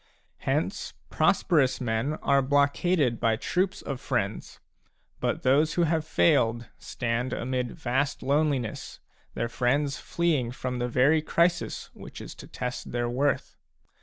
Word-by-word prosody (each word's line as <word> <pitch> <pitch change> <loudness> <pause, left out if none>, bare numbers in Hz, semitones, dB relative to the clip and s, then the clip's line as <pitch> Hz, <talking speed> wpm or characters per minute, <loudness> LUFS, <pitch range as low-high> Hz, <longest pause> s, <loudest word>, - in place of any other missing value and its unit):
Hence - - -1 0.2
prosperous 145 -7 +2
men 120 +4 -1
are 140 0 +4
blockaded 140 -1 +2
by 115 -1 +2
troops 185 - -1
of 140 -2 -5
friends; 110 -6 -3 0.6
but - - -1
those 150 +4 +3
who 175 - +3
have 160 -1 +1
failed 115 - +2
stand 125 +1 -2
amid 125 -1 -2
vast 135 +3 -1
loneliness, 140 -4 -1 0.4
their 115 - -1
friends 140 +4 0
fleeing 160 -8 0
from 125 -1 -4
the 120 - 0
very 140 +6 +4
crisis 170 +2 0
which - - -10
is - - -8
to - - -12
test 125 0 -5
their 120 0 -1
worth. 140 +3 0
130 Hz, 135 wpm, -27 LUFS, 120-150 Hz, 0.6 s, are